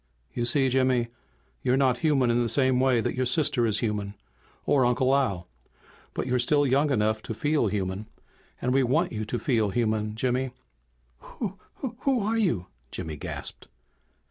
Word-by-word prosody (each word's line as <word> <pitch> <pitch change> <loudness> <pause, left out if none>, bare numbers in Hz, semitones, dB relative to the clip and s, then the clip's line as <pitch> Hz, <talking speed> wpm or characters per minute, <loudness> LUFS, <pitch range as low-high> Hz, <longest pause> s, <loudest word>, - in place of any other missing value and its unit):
"You 120 - -1
see, 135 +2 +3
Jimmy, 130 -2 +2 0.5
you're 130 0 +2
not 130 -3 +2
human 135 -6 +3
in 120 +1 +2
the 120 - 0
same 130 -1 +3
way 130 -3 +3
that - - -1
your 130 0 0
sister 130 -4 +2
is 110 -1 0
human 105 -3 -2 0.5
or 135 -2 +3
Uncle 130 +2 +3
Al. 100 -11 0 0.7
But - - -2
you're 125 0 +1
still 145 +4 +3
young 140 +3 +2
enough 110 -4 +1
to 110 - -6
feel 145 +1 +1
human, 95 +1 -3 0.5
and 125 - 0
we 135 - +4
want 155 +8 +1
you 110 -1 -3
to 120 - -2
feel 115 -5 +1
human, 110 -1 0
Jimmy." 125 +2 -1 0.9
"W 195 -5 -3 0.4
Who 265 -4 +1
are 220 +3 0
you?" 120 - +1 0.2
Jimmy 80 +2 -5
gasped. 70 - -6
125 Hz, 170 wpm, -27 LUFS, 110-135 Hz, 0.9 s, we